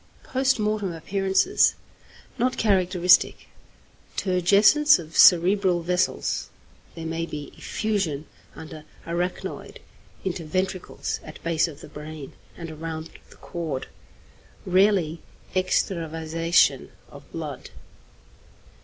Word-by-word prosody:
Post 265 Hz, 0 st, +1 dB
Mortem 210 Hz, -4 st, -1 dB
Appearances. 195 Hz, -, +2 dB, 0.6 s
Not 250 Hz, +2 st, +1 dB
characteristic. 185 Hz, -4 st, +3 dB, 0.7 s
Turgescence 200 Hz, -, +5 dB
of 160 Hz, -2 st, -10 dB
cerebral 180 Hz, 0 st, +5 dB
vessels. 180 Hz, +1 st, -1 dB, 0.5 s
There 165 Hz, -1 st, -7 dB
may 165 Hz, +1 st, -3 dB
be 150 Hz, -3 st, -7 dB
effusion 190 Hz, -9 st, -2 dB, 0.3 s
under 155 Hz, -1 st, -10 dB, 0.2 s
arachnoid, 175 Hz, +2 st, -4 dB, 0.5 s
into 180 Hz, -2 st, -3 dB
ventricles, 185 Hz, +3 st, -3 dB
at 155 Hz, -, -11 dB
base 165 Hz, 0 st, +1 dB
of 150 Hz, -3 st, -10 dB
the -, -, -10 dB
brain, 150 Hz, -1 st, -9 dB, 0.2 s
and 165 Hz, -2 st, -7 dB
around 160 Hz, 0 st, -6 dB, 0.2 s
the -, -, -16 dB
cord. 160 Hz, -6 st, -5 dB, 0.8 s
Rarely 185 Hz, -4 st, +2 dB, 0.3 s
extravasation 165 Hz, -2 st, +1 dB, 0.2 s
of -, -, -14 dB
blood. -, -, -6 dB
175 Hz, 95 wpm, -25 LUFS, 160-195 Hz, 0.8 s, Turgescence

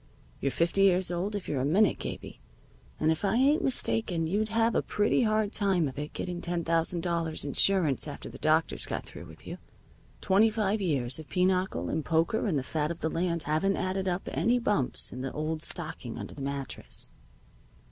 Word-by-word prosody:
You're 140 Hz, -, 0 dB
fifty 170 Hz, +8 st, +1 dB
years 185 Hz, -2 st, +4 dB
old 185 Hz, +4 st, -2 dB
if 200 Hz, -, -4 dB
you're 135 Hz, -3 st, -1 dB
a -, -, 0 dB
minute, 185 Hz, +9 st, +3 dB
Gabie, -, -, -6 dB, 0.6 s
and 155 Hz, -, +3 dB
if 160 Hz, -, -2 dB
I 205 Hz, -, +2 dB
ain't 275 Hz, +5 st, +4 dB
mistaken 220 Hz, -9 st, 0 dB
you'd 210 Hz, +6 st, 0 dB
have 225 Hz, +1 st, +2 dB
a -, -, +2 dB
pretty 210 Hz, +4 st, +1 dB
hard 215 Hz, -2 st, +1 dB
time 190 Hz, -6 st, +2 dB
of 135 Hz, +1 st, -6 dB
it 150 Hz, +1 st, -5 dB
getting 175 Hz, -1 st, -4 dB
ten 170 Hz, -1 st, -2 dB
thousand 165 Hz, +1 st, 0 dB
dollars' 165 Hz, -3 st, -1 dB
insurance 155 Hz, -1 st, +3 dB
after -, -, -7 dB
the -, -, -10 dB
doctors -, -, +1 dB
got -, -, -3 dB
through -, -, -10 dB
with -, -, -15 dB
you. -, -, -7 dB, 0.6 s
Twenty 205 Hz, -, +4 dB
five 215 Hz, -1 st, 0 dB
years 135 Hz, -7 st, 0 dB
of 155 Hz, -, -10 dB
pinochle 180 Hz, -, +1 dB
and 155 Hz, -, -1 dB
poker 165 Hz, +9 st, +1 dB
and 165 Hz, -7 st, +1 dB
the 135 Hz, -, -1 dB
fat 150 Hz, +2 st, -1 dB
of 170 Hz, 0 st, -5 dB
the 160 Hz, -, 0 dB
land 170 Hz, -1 st, 0 dB
haven't 160 Hz, +7 st, +1 dB
added 190 Hz, +1 st, -1 dB
up 180 Hz, +1 st, -2 dB
any 210 Hz, -, +2 dB
bumps 210 Hz, -, 0 dB
in 125 Hz, -, -6 dB
the 135 Hz, 0 st, -3 dB
old 155 Hz, +1 st, -2 dB
stocking -, -, -5 dB
under -, -, -7 dB
the 140 Hz, -, -9 dB
mattress." 135 Hz, -, -4 dB
175 Hz, 200 wpm, -29 LUFS, 155-200 Hz, 0.6 s, years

